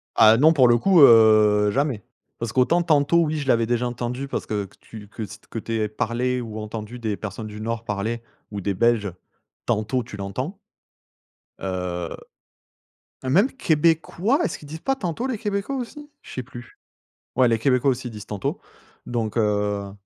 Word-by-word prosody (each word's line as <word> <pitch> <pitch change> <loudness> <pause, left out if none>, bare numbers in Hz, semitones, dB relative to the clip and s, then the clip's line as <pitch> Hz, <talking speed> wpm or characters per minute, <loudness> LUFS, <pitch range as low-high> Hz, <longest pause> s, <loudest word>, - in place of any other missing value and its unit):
Ah 110 0 +7
non, 155 +5 +6
pour 130 -5 +5
le 120 0 +5
coup, 185 +8 +4
heu, 110 -4 +6
jamais, 135 -5 -1 0.4
parce 115 -1 -3
qu'autant 130 +8 +3
«tantôt,» 155 0 +3
oui, 155 0 -1
je 140 -2 -4
l'avais 115 -3 +3
déjà 120 +1 0
entendu 120 +2 -4
parce - - -4
que 105 -2 -3
tu 105 -2 -11
que 110 +2 -7
s 105 - -9
que 115 - -4
tu 115 - -5
aies 110 - +1
parlé 120 +4 -1
ou 110 -2 -6
entendu 110 +2 -6
des 110 -3 -2
personnes 110 +1 -6
du 105 0 -8
nord 115 +1 -3
parler 110 +3 -2 0.3
ou 105 - -4
des 100 +1 -1
belges, 110 0 +2 0.5
«tantôt» 120 +2 0
tu 105 -3 -10
l'entends 125 - -4 1.0
heu, 90 -2 -3 1.2
même 200 - +4
québécois, 170 - +1
est-ce - - -3
qu'ils 150 - -13
disent 160 +2 -7
pas 270 +7 0
«tantôt» 195 +2 -3
les 255 -4 -2
québécois 205 +5 -2
aussi? 295 +4 -7
Je - - -12
sais 130 - -3
plus. 120 0 -12 0.6
Ouais, 130 0 +5
les 115 -1 +2
québécois 125 +3 +2
aussi 125 -1 -3
disent: 105 -2 -9
«tantôt», 100 -2 -3 0.5
donc 115 -3 -3
heu 105 -2 0
120 Hz, 175 wpm, -23 LUFS, 105-145 Hz, 1.2 s, Ah